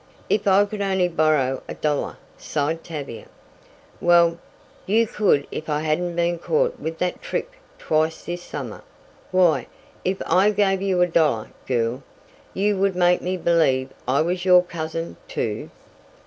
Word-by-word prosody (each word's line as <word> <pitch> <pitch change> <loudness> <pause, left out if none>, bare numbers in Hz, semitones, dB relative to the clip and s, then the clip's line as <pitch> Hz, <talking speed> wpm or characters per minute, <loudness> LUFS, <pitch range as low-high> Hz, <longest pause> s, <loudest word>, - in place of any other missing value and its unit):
"If 205 - +1
I 200 +1 +5
could 205 0 -6
only 190 -2 +2
borrow 155 -6 +1
a - - -6
dollar!" 150 -2 -1 0.2
sighed 160 +2 -2
Tavia. 145 -8 -7 0.7
"Well, 170 -1 +4 0.5
you 225 +4 +3
could 195 -10 +2
if 155 - -6
I 150 0 0
hadn't 170 +3 -1
been 170 0 0
caught 485 - 0
with 160 0 -4
that 180 +1 -2
trick - - -3 0.3
twice 160 +1 0
this 175 +1 -5
summer. - - -7 0.5
Why, 185 -3 +3 0.4
if 190 +1 -1
I 190 +3 +4
gave 195 -2 +1
you 190 -2 +1
a - - +2
dollar, 155 -10 +1 0.2
girl, 120 0 0 0.5
you 205 +1 +1
would 195 -1 +2
make 180 0 +3
me 185 +1 -2
believe 155 -7 +2 0.2
I 130 +3 +3
was 180 +2 -1
your 180 -1 +6
cousin, 165 -1 -5
too." 105 -2 -3
175 Hz, 150 wpm, -23 LUFS, 155-190 Hz, 0.7 s, your